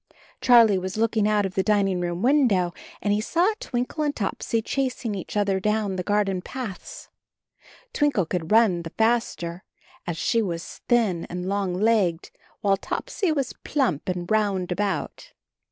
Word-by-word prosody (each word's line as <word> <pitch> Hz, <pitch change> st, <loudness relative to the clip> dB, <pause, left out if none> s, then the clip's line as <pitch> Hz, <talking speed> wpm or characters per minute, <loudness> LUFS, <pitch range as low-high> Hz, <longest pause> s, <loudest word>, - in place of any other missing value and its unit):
Charlie 230 Hz, -6 st, +6 dB
was 185 Hz, +2 st, -5 dB
looking 220 Hz, -1 st, +2 dB
out 210 Hz, -1 st, +2 dB
of 190 Hz, -, -4 dB
the 190 Hz, -, +1 dB
dining 195 Hz, -3 st, +1 dB
room 175 Hz, +2 st, -3 dB
window, 235 Hz, -11 st, +3 dB, 0.3 s
and 205 Hz, -, +2 dB
he 210 Hz, -, +1 dB
saw 350 Hz, -, +2 dB
Twinkle 250 Hz, +5 st, -2 dB
and 290 Hz, -1 st, -1 dB
Topsy 225 Hz, +2 st, -1 dB
chasing 250 Hz, -1 st, -2 dB
each 195 Hz, +1 st, -5 dB
other 200 Hz, -2 st, +1 dB
down 210 Hz, -1 st, 0 dB
the 185 Hz, -, -2 dB
garden 195 Hz, -1 st, 0 dB
paths. 235 Hz, -3 st, -7 dB, 0.8 s
Twinkle 280 Hz, -, +2 dB
could 165 Hz, 0 st, -3 dB
run 215 Hz, -6 st, +4 dB
the 165 Hz, -, -7 dB
faster, 220 Hz, -6 st, -1 dB, 0.4 s
as 170 Hz, -2 st, -3 dB
she 230 Hz, -, +1 dB
was 175 Hz, -5 st, -5 dB
thin 220 Hz, -9 st, +2 dB
and 180 Hz, +1 st, -4 dB
long 195 Hz, -2 st, -1 dB
legged, 195 Hz, -5 st, +1 dB, 0.3 s
while 195 Hz, -1 st, +3 dB
Topsy 360 Hz, -, -2 dB
was 275 Hz, -4 st, -1 dB
plump 250 Hz, -, 0 dB
and 180 Hz, -1 st, -2 dB
round 200 Hz, -4 st, +1 dB
about. 195 Hz, -3 st, -3 dB
205 Hz, 155 wpm, -24 LUFS, 180-230 Hz, 0.8 s, Charlie